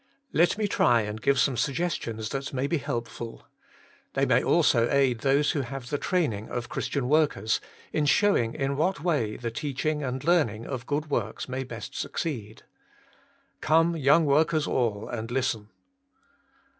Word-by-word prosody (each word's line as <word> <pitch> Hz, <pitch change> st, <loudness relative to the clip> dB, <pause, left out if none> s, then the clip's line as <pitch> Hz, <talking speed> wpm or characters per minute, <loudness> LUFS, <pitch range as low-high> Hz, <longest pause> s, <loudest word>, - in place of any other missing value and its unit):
Let 170 Hz, +4 st, +3 dB
me 215 Hz, -1 st, 0 dB
try 120 Hz, -, +3 dB
and 105 Hz, 0 st, -5 dB
give 140 Hz, +1 st, +2 dB
some 135 Hz, 0 st, +2 dB
suggestions 120 Hz, -5 st, -2 dB
that 140 Hz, 0 st, -4 dB
may 130 Hz, +1 st, -1 dB
be 165 Hz, +2 st, 0 dB
helpful. 115 Hz, -1 st, -5 dB, 0.7 s
They -, -, +2 dB
may -, -, +3 dB
also 115 Hz, 0 st, +3 dB
aid 135 Hz, -4 st, +2 dB
those 140 Hz, +3 st, +2 dB
who 150 Hz, -, -1 dB
have 130 Hz, 0 st, -7 dB
the 145 Hz, -, 0 dB
training 130 Hz, -, -1 dB
of 120 Hz, -1 st, -4 dB
Christian 135 Hz, -3 st, -2 dB
workers, 140 Hz, -8 st, +2 dB, 0.3 s
in 150 Hz, -1 st, +1 dB
showing 145 Hz, -, +3 dB
in 135 Hz, 0 st, -1 dB
what 160 Hz, 0 st, 0 dB
way 135 Hz, -12 st, 0 dB
the 120 Hz, -1 st, -4 dB
teaching 150 Hz, +3 st, -2 dB
and 130 Hz, -1 st, -3 dB
learning 135 Hz, -11 st, +2 dB
of 130 Hz, -2 st, -5 dB
good 150 Hz, +1 st, -2 dB
works 110 Hz, -5 st, -2 dB
may 130 Hz, +1 st, -3 dB
best 130 Hz, -, -8 dB
succeed. 115 Hz, -10 st, -4 dB, 1.0 s
Come, 165 Hz, +2 st, +3 dB
young 155 Hz, +2 st, +4 dB
workers 155 Hz, +2 st, +3 dB
all, 110 Hz, -4 st, -1 dB
and 115 Hz, -1 st, -5 dB
listen. 120 Hz, -4 st, -1 dB
135 Hz, 155 wpm, -27 LUFS, 115-150 Hz, 1.0 s, young